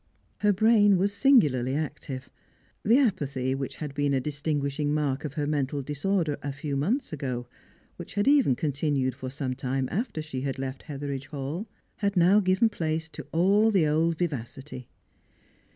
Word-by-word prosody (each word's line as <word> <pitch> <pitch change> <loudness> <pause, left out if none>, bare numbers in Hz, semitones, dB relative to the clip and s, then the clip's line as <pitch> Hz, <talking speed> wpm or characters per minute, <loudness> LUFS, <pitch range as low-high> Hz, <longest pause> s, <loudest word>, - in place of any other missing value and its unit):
Her 210 0 +4
brain 205 -1 +5
was 200 +3 +1
singularly 145 - +4
active; 135 -3 -4 0.6
the 225 +4 +5
apathy 140 - +1
which 135 0 -4
had 150 -3 -6
been 145 -1 +1
a - - +2
distinguishing 145 +1 -1
mark 145 -2 -1
of 145 -1 -5
her 150 - -1
mental 145 -1 -1
disorder 150 +2 -1
a 145 - -3
few 140 +1 -4
months 205 - -1
ago, 130 -5 -3 0.5
which - - -9
had 205 +3 +1
even 280 - +5
continued 140 -2 0
for 130 0 -6
some 130 -1 -3
time 130 +1 -2
after 220 -3 -2
she 135 -4 -5
had 135 -1 -3
left 135 0 -5
Hetheridge 140 -2 -5
Hall, 150 +8 -5 0.3
had 200 -2 -1
now 180 +4 +6
given 190 +3 +3
place 160 -6 -2
to 150 - -9
all 200 +6 +4
the 190 -7 +3
old 160 +2 +2
vivacity. 135 -4 -4
150 Hz, 165 wpm, -27 LUFS, 135-185 Hz, 0.6 s, now